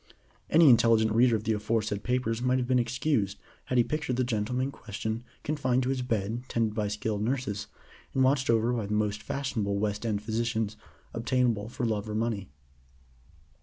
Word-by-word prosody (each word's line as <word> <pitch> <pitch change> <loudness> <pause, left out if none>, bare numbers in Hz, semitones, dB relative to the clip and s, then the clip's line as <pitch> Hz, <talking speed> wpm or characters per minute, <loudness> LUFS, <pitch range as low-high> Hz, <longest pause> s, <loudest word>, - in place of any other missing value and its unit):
Any 160 0 +6
intelligent 115 -3 +5
reader 115 +1 +4
of 110 - -2
the 110 - +1
aforesaid 105 -1 -1
papers 120 -1 -1
might 125 +1 +2
have 125 - 0
been 130 0 +3
excused 120 -4 0 0.3
had 125 - -1
he 120 - +6
pictured 150 -2 -2
the 130 - +1
gentleman 125 +2 -1
in 140 - -3
question 110 0 -5 0.2
confined 130 -4 +1
to 125 - -1
his 135 -1 0
bed 110 -1 -1
tended 115 -2 0
by 105 -1 -1
skilled 105 0 -2
nurses, 110 -3 -2 0.5
and 130 - +4
watched 130 0 +2
over 115 +1 +3
by 115 -4 -2
the 105 - -2
most 105 -1 0
fashionable 110 -7 -2
West 105 +1 -1
End 105 -3 -1
physicians 110 -1 -1 0.4
obtainable 115 -3 0
for 130 0 -3
love 110 -1 -1
or 105 - -3
money. 110 -3 -2
115 Hz, 180 wpm, -28 LUFS, 105-125 Hz, 0.5 s, Any